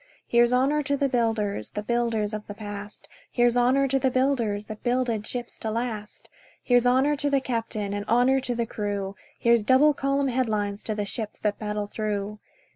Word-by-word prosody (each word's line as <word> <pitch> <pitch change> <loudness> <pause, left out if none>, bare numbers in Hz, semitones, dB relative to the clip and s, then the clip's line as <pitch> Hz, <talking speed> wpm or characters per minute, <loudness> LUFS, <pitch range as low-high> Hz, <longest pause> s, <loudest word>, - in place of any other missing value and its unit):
Here's 240 0 +4
honour 270 +4 +3
to 280 0 0
the 280 - +2
builders 225 - 0
– - - -40
The 210 - -2
builders 225 -2 0
of 215 0 -5
the 205 - -7
past; 205 -1 -8 0.2
Here's 240 -1 +3
honour 255 +3 +3
to 270 +1 +2
the 265 - +2
builders 245 -6 0
That 215 0 -8
builded 240 -3 0
ships 245 -1 -5
to 220 - -3
last; 220 -2 -4 0.4
Here's 245 -1 +4
honour 265 +4 +3
to 285 +1 0
the 280 -1 +3
captain, 225 -5 -3
And 205 0 -2
honour 250 +4 +4
to 255 -2 -3
the 235 0 0
crew; 205 -3 -3 0.2
Here's 235 -1 +4
double 265 +6 +5
column 275 0 0
headlines 215 -5 -1
To 215 - -2
the 205 -1 -2
ships 215 +1 -4
that 210 -1 -1
battle 210 -1 -2
through. 210 0 -3
235 Hz, 195 wpm, -26 LUFS, 210-255 Hz, 0.4 s, double